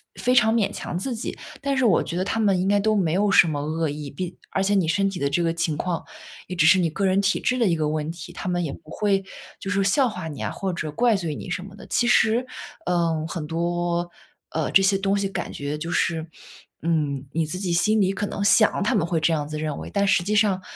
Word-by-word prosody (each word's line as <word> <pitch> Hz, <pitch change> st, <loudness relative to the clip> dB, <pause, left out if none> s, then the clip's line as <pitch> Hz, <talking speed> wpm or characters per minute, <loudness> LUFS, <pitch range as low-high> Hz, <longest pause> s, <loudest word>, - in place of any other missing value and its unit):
非 -, -, -9 dB
非 250 Hz, 0 st, +3 dB
常 220 Hz, -2 st, +5 dB
勉 225 Hz, -4 st, +1 dB
强 175 Hz, -, -4 dB
自 245 Hz, +7 st, -3 dB
己。 220 Hz, -, -5 dB, 0.2 s
但 275 Hz, -1 st, -1 dB
是 260 Hz, -, +2 dB
我 195 Hz, -, +4 dB
觉 170 Hz, -, -4 dB
得 185 Hz, -, +1 dB
他 225 Hz, -, -1 dB
们 200 Hz, -4 st, +3 dB
应 185 Hz, -, 0 dB
该 205 Hz, 0 st, +3 dB
都 215 Hz, +1 st, +2 dB
没 175 Hz, -6 st, +1 dB
有 200 Hz, +3 st, +2 dB
什 175 Hz, -, +6 dB
么 150 Hz, -2 st, -2 dB
恶 160 Hz, +2 st, -1 dB
意， 145 Hz, 0 st, -6 dB
并 175 Hz, +6 st, -5 dB
而 195 Hz, -, 0 dB
且 200 Hz, +1 st, +2 dB
你 185 Hz, -5 st, +2 dB
身 195 Hz, +4 st, +2 dB
体 185 Hz, -, -6 dB
的 140 Hz, 0 st, 0 dB
这 170 Hz, +4 st, 0 dB
个 165 Hz, -, +1 dB
情 165 Hz, -2 st, -1 dB
况 175 Hz, 0 st, -2 dB, 0.4 s
也 185 Hz, -, -5 dB
只 155 Hz, -, +3 dB
是 185 Hz, +3 st, +6 dB
你 170 Hz, -, +2 dB
个 195 Hz, +5 st, -2 dB
人 190 Hz, +1 st, +3 dB
体 200 Hz, 0 st, +1 dB
质 255 Hz, 0 st, 0 dB
的 230 Hz, -, +3 dB
一 170 Hz, -, +2 dB
个 155 Hz, -2 st, 0 dB
问 155 Hz, +1 st, -2 dB
题， 170 Hz, 0 st, -9 dB
他 180 Hz, -, -5 dB
们 175 Hz, 0 st, 0 dB
也 140 Hz, -, -4 dB
不 -, -, -14 dB
会， 195 Hz, +2 st, 0 dB, 0.4 s
就 195 Hz, -, -6 dB
是 200 Hz, -1 st, +1 dB
笑 250 Hz, +7 st, +3 dB
话 180 Hz, -6 st, -6 dB
你 145 Hz, -4 st, -7 dB
啊， -, -, -1 dB
或 190 Hz, -2 st, -3 dB
者 155 Hz, -3 st, -4 dB
怪 235 Hz, +6 st, +2 dB
罪 170 Hz, -6 st, -3 dB
你 185 Hz, -, -7 dB
什 180 Hz, +1 st, -3 dB
么 195 Hz, 0 st, -11 dB
的。 205 Hz, -, -12 dB
其 240 Hz, -, +1 dB
实 240 Hz, +1 st, +3 dB, 0.4 s
嗯， 165 Hz, -3 st, 0 dB
很 165 Hz, -2 st, -5 dB
多 175 Hz, +1 st, -1 dB, 0.4 s
呃， 160 Hz, -1 st, -1 dB
这 195 Hz, -, +6 dB
些 195 Hz, 0 st, +3 dB
东 195 Hz, +1 st, 0 dB
西 200 Hz, -, 0 dB
感 195 Hz, -, -4 dB
觉 145 Hz, +1 st, -4 dB
就 165 Hz, +3 st, -5 dB
是 160 Hz, -2 st, 0 dB, 0.6 s
嗯， 150 Hz, -4 st, -1 dB
你 165 Hz, 0 st, +1 dB
自 180 Hz, +4 st, -3 dB
己 180 Hz, -3 st, -1 dB
心 215 Hz, +5 st, +3 dB
里 195 Hz, -1 st, +2 dB
可 205 Hz, -, -2 dB
能 200 Hz, -, -5 dB
想 215 Hz, +1 st, +4 dB
他 235 Hz, +5 st, +1 dB
们 180 Hz, -6 st, +2 dB
会 170 Hz, -1 st, 0 dB
这 160 Hz, +1 st, +2 dB
样 150 Hz, -2 st, -1 dB
子 155 Hz, +1 st, -5 dB
认 155 Hz, -2 st, -3 dB
为， -, -, -7 dB
但 200 Hz, 0 st, +2 dB
实 180 Hz, -2 st, +3 dB
际 210 Hz, -, -1 dB
上 205 Hz, -3 st, +2 dB
180 Hz, 290 characters per minute, -24 LUFS, 160-200 Hz, 0.6 s, 什